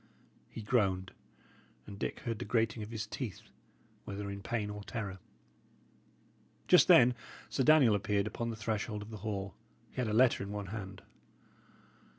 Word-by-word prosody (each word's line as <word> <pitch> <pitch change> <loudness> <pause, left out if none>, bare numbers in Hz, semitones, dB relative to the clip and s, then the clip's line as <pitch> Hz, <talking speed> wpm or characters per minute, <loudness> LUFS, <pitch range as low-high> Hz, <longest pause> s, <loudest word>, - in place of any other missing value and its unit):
He 110 - -8
groaned, 95 -5 +1 0.7
and 100 -1 -9
Dick - - -3
heard 115 -5 -3
the - - -4
grating 110 +1 +1
of 105 - -6
his 110 -2 -4
teeth, 110 - -6 0.6
whether 100 0 -5
in 100 0 -6
pain 105 0 -2
or 105 0 -7
terror. 100 -4 -5 1.5
Just - - +7
then 125 0 +7 0.4
Sir - - 0
Daniel 145 -6 +6
appeared 100 -1 +1
upon 115 +2 -3
the 115 - -3
threshold 105 -1 -3
of 105 - -11
the 110 - -6
hall. 100 -2 -4 0.4
He - - -22
had 125 -2 0
a 105 - -1
letter 125 +3 +4
in 100 - -4
one 105 -1 -4
hand. 95 -3 -7
105 Hz, 160 wpm, -33 LUFS, 100-115 Hz, 1.5 s, Just